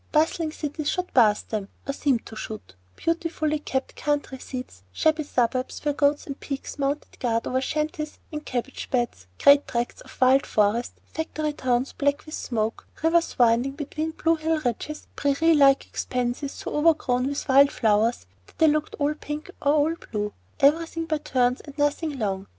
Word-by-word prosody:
Bustling 315 Hz, +1 st, +2 dB
cities 300 Hz, -1 st, -3 dB
shot 360 Hz, 0 st, -2 dB
past 215 Hz, -5 st, +4 dB
them, 210 Hz, -3 st, -2 dB, 0.2 s
or 275 Hz, -, -1 dB
seemed 275 Hz, -5 st, 0 dB
to 220 Hz, -, -10 dB
shoot, 215 Hz, -, -7 dB, 0.2 s
beautifully 330 Hz, -2 st, -1 dB
kept 265 Hz, -2 st, -3 dB
country 290 Hz, -3 st, -2 dB
seats, 250 Hz, -, -7 dB
shabby 315 Hz, -, +2 dB
suburbs 255 Hz, 0 st, -1 dB
where 295 Hz, -, +2 dB
goats 285 Hz, +1 st, +2 dB
and 275 Hz, -1 st, -6 dB
pigs 275 Hz, +1 st, -6 dB
mounted 280 Hz, +2 st, -2 dB
guard 230 Hz, -2 st, 0 dB
over 260 Hz, +1 st, 0 dB
shanties 305 Hz, +2 st, -2 dB
and 300 Hz, -1 st, -5 dB
cabbage 255 Hz, 0 st, -4 dB
beds, 240 Hz, -, -1 dB
great 285 Hz, 0 st, +6 dB
tracts 240 Hz, 0 st, -2 dB
of -, -, -15 dB
wild 260 Hz, +2 st, +5 dB
forest, 215 Hz, +3 st, +1 dB
factory 310 Hz, -1 st, -3 dB
towns 255 Hz, -1 st, 0 dB
black 285 Hz, +1 st, 0 dB
with 310 Hz, -, -10 dB
smoke, 225 Hz, -6 st, -2 dB, 0.2 s
rivers 335 Hz, +1 st, +2 dB
winding 240 Hz, +2 st, +3 dB
between 310 Hz, +2 st, -3 dB
blue 325 Hz, +1 st, +1 dB
hill 320 Hz, 0 st, 0 dB
ridges, 250 Hz, +6 st, -3 dB
prairie 290 Hz, +4 st, +3 dB
like 275 Hz, -2 st, +5 dB
expanses 250 Hz, +3 st, -2 dB
so -, -, -6 dB
overgrown 295 Hz, -5 st, +2 dB
with 285 Hz, +2 st, -3 dB
wild 275 Hz, +1 st, +6 dB
flowers 220 Hz, -, +2 dB, 0.2 s
that -, -, -22 dB
they 320 Hz, -, +5 dB
looked 305 Hz, 0 st, +1 dB
all 290 Hz, +1 st, +1 dB
pink 300 Hz, 0 st, -6 dB
or 285 Hz, 0 st, +3 dB, 0.2 s
all 330 Hz, -, -2 dB, 0.2 s
blue, 210 Hz, -1 st, -2 dB, 0.3 s
everything 330 Hz, +3 st, +3 dB
by 310 Hz, -1 st, -1 dB
turns 255 Hz, -4 st, +1 dB
and 290 Hz, -1 st, -12 dB
nothing 290 Hz, 0 st, 0 dB
long. 195 Hz, -5 st, -2 dB
280 Hz, 170 wpm, -25 LUFS, 245-305 Hz, 0.3 s, great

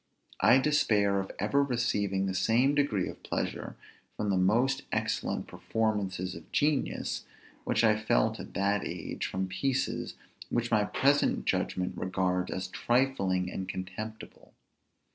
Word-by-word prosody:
I 125 Hz, -, +6 dB
despair 110 Hz, -9 st, +3 dB
of 95 Hz, -, -4 dB
ever 140 Hz, +8 st, +2 dB
receiving 105 Hz, -7 st, 0 dB
the 95 Hz, -, -1 dB
same 120 Hz, +8 st, +3 dB
degree 140 Hz, -10 st, +1 dB
of -, -, -8 dB
pleasure -, -, -3 dB, 0.4 s
from 105 Hz, -1 st, 0 dB
the -, -, +2 dB
most 115 Hz, +9 st, +2 dB
excellent -, -, -1 dB
performances 100 Hz, -5 st, -2 dB
of 85 Hz, -, -11 dB
genius, 145 Hz, -2 st, 0 dB, 0.4 s
which 110 Hz, -, +1 dB
I 110 Hz, -1 st, +5 dB
felt -, -, +2 dB
at -, -, -9 dB
that 100 Hz, +1 st, +1 dB
age 85 Hz, -1 st, -4 dB
from 95 Hz, 0 st, -2 dB
pieces 130 Hz, +8 st, -1 dB, 0.3 s
which 120 Hz, 0 st, -1 dB
my 105 Hz, -2 st, +3 dB
present 140 Hz, +6 st, +2 dB
judgment 90 Hz, 0 st, 0 dB
regards 90 Hz, -1 st, -1 dB
as 95 Hz, 0 st, -3 dB
trifling 100 Hz, -8 st, +1 dB
and 95 Hz, -, -5 dB
contemptible. 95 Hz, +4 st, -7 dB
105 Hz, 135 wpm, -30 LUFS, 95-120 Hz, 0.4 s, I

